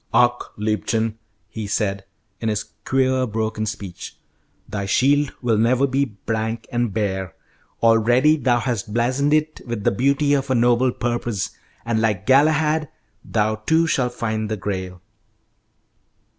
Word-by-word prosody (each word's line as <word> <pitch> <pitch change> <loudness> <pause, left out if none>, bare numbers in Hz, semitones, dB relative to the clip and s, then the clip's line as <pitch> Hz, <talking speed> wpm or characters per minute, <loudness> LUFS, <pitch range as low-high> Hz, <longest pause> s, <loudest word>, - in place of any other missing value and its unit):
"Ach, 120 0 +3
liebchen," 110 +1 -1 0.3
he 110 -2 -6
said, 100 -1 -1 0.3
in 115 - -1
his 105 -1 -1 0.2
queer 130 -1 +2
broken 110 0 -2
speech, 100 -4 -7 0.5
"thy 100 -1 -4
shield 140 +7 +3
will 115 -3 +2
never 125 +4 +3
be 140 +1 +1
blank 110 +1 -4
and 120 -2 0
bare. 95 -4 -2 0.5
Already 120 +6 +5
thou 130 -5 +2
hast 115 -4 -3
blazoned 130 +5 +1
it 155 0 +1
with 115 -3 -4
the - - +3
beauty 140 +6 +2
of 140 -1 0
a 130 - +2
noble 120 +2 +3
purpose, 120 -4 -2 0.3
and 115 -1 0
like 105 -3 0
Galahad, 150 +2 +3 0.3
thou 110 0 0
too 160 +10 +2
shalt 125 -6 0
find 110 -2 -2
the 110 - -2
Grail." 95 -2 -5
115 Hz, 140 wpm, -22 LUFS, 105-130 Hz, 0.5 s, Already